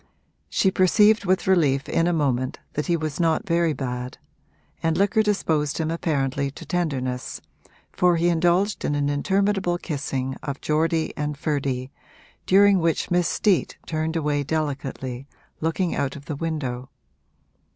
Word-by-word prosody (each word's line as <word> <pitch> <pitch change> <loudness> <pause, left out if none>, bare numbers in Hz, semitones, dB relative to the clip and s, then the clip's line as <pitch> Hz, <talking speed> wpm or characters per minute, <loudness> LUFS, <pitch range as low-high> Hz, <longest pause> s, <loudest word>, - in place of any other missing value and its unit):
She 190 - +2
perceived 205 +3 +4
with 185 0 +1
relief 145 -8 +2
in 165 +1 +1
a - - +2
moment 130 -6 0 0.2
that 150 - -2
he 170 -1 +2
was 155 -1 -4
not 165 -2 +1
very 170 -2 +2
bad, 125 -3 -4 0.6
and 165 -1 +1
liquor 200 +2 +3
disposed 160 -8 0
him 160 -1 -1
apparently 140 -4 -1
to 140 - -11
tenderness, 130 -8 -2 0.5
for 180 -1 +3
he 170 +1 +2
indulged 175 +4 +2
in 145 - 0
an 145 0 0
interminable 190 +4 +1
kissing 135 -5 -3
of 140 -1 -5
Geordie 160 +1 0
and 150 -1 -3
Ferdy, 140 -3 -2 0.6
during 200 0 +6
which 165 +2 0
Miss 175 -1 +3
Steet 200 -4 +1
turned 160 0 -2
away 150 -2 0
delicately, 135 -3 -3 0.3
looking 165 +3 0
out 140 0 -1
of 145 -1 -10
the 150 - -4
window. 135 -5 -3
155 Hz, 145 wpm, -24 LUFS, 140-175 Hz, 0.6 s, during